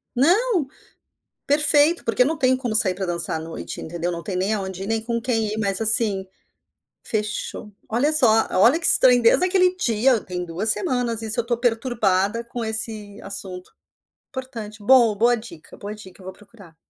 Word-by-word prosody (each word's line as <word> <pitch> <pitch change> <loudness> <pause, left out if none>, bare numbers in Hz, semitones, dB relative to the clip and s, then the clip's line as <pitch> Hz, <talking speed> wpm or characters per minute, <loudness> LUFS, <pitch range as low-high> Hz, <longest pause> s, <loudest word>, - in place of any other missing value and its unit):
Não, 355 - +1 0.8
perfeito, 295 +3 +4
porque 230 +2 +2
não 315 +3 -2
tem 260 -1 +2
como 245 -4 -4
sair 195 -4 +4
pra 190 +1 -5
dançar 170 -2 -1
à - - -6
noite, 165 0 -8
entendeu. 170 +2 -5
Não 170 0 -6
tem 190 - -5
nem 190 +4 -1
aonde 190 -2 -5
ir, - - -7
nem 225 0 -2
com 235 +1 -3
quem 225 -3 -1
ir, - - -6
mas 200 -2 -2
assim, 215 -3 +2 0.8
fechou! 210 -1 -5 0.2
Olha 255 +7 0
só! 225 -7 +5
Olha 235 - +3
que 335 - -3
estranho, 250 -2 +6
desde 230 +10 +4
aquele 365 0 +1
dia, 240 -4 +1
tem 180 -1 -6
2 175 +6 -3
semanas 245 - 0
isso, 220 +1 -2
eu - - 0
estou 235 0 -2
perturbada 225 -3 -1
com 235 0 -7
esse 220 -2 -4
assunto. 185 -2 -5 0.6
Importante, 235 -6 -8
bom, 235 0 +4
boa 235 +4 +2
dica, 220 -9 -12
boa 205 +1 -8
dica! 190 -3 -14
Eu - - -15
vou 190 - -8
procurar. 200 -5 -19
225 Hz, 180 wpm, -21 LUFS, 200-250 Hz, 0.8 s, estranho